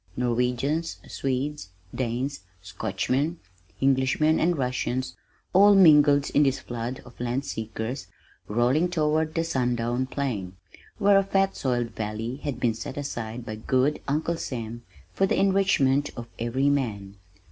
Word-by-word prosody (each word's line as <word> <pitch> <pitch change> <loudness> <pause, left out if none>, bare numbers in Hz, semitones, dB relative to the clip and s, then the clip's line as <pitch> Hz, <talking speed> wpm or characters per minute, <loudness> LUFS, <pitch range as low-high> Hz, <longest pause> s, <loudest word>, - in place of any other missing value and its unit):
Norwegians, 125 +6 0
Swedes, 135 -3 -3 0.2
Danes, 130 +3 -2 0.2
Scotchmen, 125 - -2 0.5
Englishmen, 135 +4 +3
and 170 0 +2
Russians 130 0 -2 0.4
all 200 +2 +7
mingled 150 -6 +6
in 145 - +4
this 135 -2 +3
flood 120 +2 -5
of 120 - -16
land 125 +3 -2
seekers 110 +3 -5 0.4
rolling 125 +10 +2
toward 155 -2 0
the 165 - +1
sundown 125 -4 0
plain, 110 -10 -3 0.4
where 200 -1 +5
a - - +1
fat 195 0 +1
soiled 120 -3 -1
valley 110 +3 -4
had 140 -4 -4
been 120 -3 +2
set 130 +5 -7
aside 120 -4 -5
by 110 - -5
good 130 +6 0
Uncle 155 +4 0
Sam 120 -5 -5 0.3
for 195 - +2
the - - +1
enrichment 175 -8 +3
of 120 -1 -6
every 125 +4 0
man. 100 -8 -2
130 Hz, 135 wpm, -26 LUFS, 120-150 Hz, 0.5 s, all